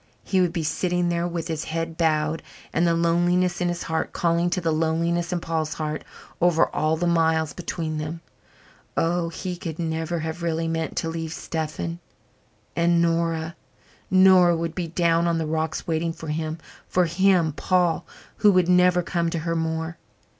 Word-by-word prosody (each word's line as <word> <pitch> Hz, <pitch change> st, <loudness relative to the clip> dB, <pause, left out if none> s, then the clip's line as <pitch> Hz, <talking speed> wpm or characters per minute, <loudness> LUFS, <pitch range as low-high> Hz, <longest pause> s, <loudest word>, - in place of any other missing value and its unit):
He 190 Hz, -2 st, +1 dB
would 180 Hz, -2 st, +2 dB
be 170 Hz, -2 st, -2 dB
sitting 175 Hz, +3 st, 0 dB
there 170 Hz, 0 st, 0 dB
with 170 Hz, -1 st, -4 dB
his 160 Hz, -2 st, -3 dB
head 165 Hz, 0 st, -3 dB
bowed 155 Hz, -1 st, +1 dB, 0.3 s
and 170 Hz, +1 st, +2 dB
the 170 Hz, -, +3 dB
loneliness 175 Hz, +2 st, +2 dB
in 175 Hz, -, +2 dB
his 175 Hz, 0 st, -3 dB
heart 160 Hz, 0 st, -2 dB
calling 170 Hz, 0 st, +1 dB
to 180 Hz, -, 0 dB
the 165 Hz, -2 st, 0 dB
loneliness 165 Hz, +2 st, 0 dB
in 180 Hz, -, 0 dB
Paul's 160 Hz, -2 st, -2 dB
heart 155 Hz, -1 st, -3 dB, 0.4 s
over 170 Hz, -2 st, +4 dB
all 155 Hz, +1 st, +1 dB
the 175 Hz, -, -1 dB
miles 160 Hz, -2 st, +2 dB
between 160 Hz, -3 st, -4 dB
them. 155 Hz, +2 st, -5 dB, 0.8 s
Oh, 170 Hz, 0 st, +1 dB
he 180 Hz, +2 st, -5 dB
could 165 Hz, -2 st, -6 dB
never 160 Hz, 0 st, -2 dB
have 160 Hz, +2 st, -4 dB
really 165 Hz, -1 st, -1 dB
meant 165 Hz, 0 st, -2 dB
to -, -, 0 dB
leave 165 Hz, -1 st, -4 dB
Stephen. 160 Hz, +1 st, -4 dB, 0.8 s
And 170 Hz, 0 st, +3 dB
Nora? 165 Hz, -1 st, 0 dB, 0.5 s
Nora 185 Hz, -2 st, +6 dB
would 165 Hz, 0 st, -3 dB
be 175 Hz, -2 st, -3 dB
down 170 Hz, 0 st, +2 dB
on 170 Hz, -1 st, +1 dB
the 160 Hz, -, -1 dB
rocks 160 Hz, +1 st, -2 dB
waiting 165 Hz, 0 st, -1 dB
for 160 Hz, -1 st, -8 dB
him 155 Hz, +1 st, -2 dB, 0.3 s
for 180 Hz, -1 st, +2 dB
him, 175 Hz, -2 st, +3 dB
Paul, 175 Hz, +1 st, +1 dB, 0.3 s
who 210 Hz, -, +5 dB
would 185 Hz, -2 st, +3 dB
never 180 Hz, 0 st, +4 dB
come 170 Hz, -1 st, -1 dB
to 170 Hz, -, -2 dB
her 165 Hz, +1 st, -2 dB
more. 160 Hz, 0 st, -2 dB
165 Hz, 175 wpm, -24 LUFS, 160-175 Hz, 0.8 s, Nora